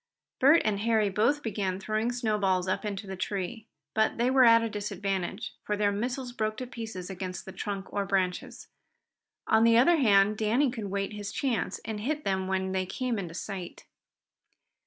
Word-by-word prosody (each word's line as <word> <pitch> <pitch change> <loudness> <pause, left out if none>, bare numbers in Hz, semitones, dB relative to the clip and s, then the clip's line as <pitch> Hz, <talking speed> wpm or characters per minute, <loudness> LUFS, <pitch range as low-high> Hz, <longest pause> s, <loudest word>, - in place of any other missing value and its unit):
Bert 285 +6 +6
and 210 -2 +1
Harry 220 -1 +2
both 225 +10 +1
began 195 -4 -2
throwing 215 +4 -1
snowballs 205 -6 0
up 185 - -1
into 200 -1 -4
the 190 -1 -6
tree, 200 +4 -4 0.3
but 220 0 +1
they 240 +2 +2
were 260 -1 +6
at 230 0 +7
a - - 0
disadvantage, 200 -1 -3
for 210 - -2
their 205 0 +2
missiles 245 +5 -3
broke 215 -2 -2
to 255 - -4
pieces 225 -7 -7
against 185 -1 -6
the 190 - -8
trunk 195 0 -5
or 200 - 0
branches. 190 -2 -2 0.8
On 220 0 +4
the 230 0 +6
other 325 +8 +5
hand 210 -5 +4
Danny 235 +5 +2
could 225 -4 -5
wait 195 +1 -2
his 205 -1 -5
chance 235 -8 -1
and 215 -1 -4
hit 295 +7 -2
them 190 -1 -1
when 190 0 -1
they 185 -1 -1
came 255 +4 -2
within 185 -5 -4
sight. 185 -1 -6
210 Hz, 180 wpm, -28 LUFS, 195-230 Hz, 0.8 s, at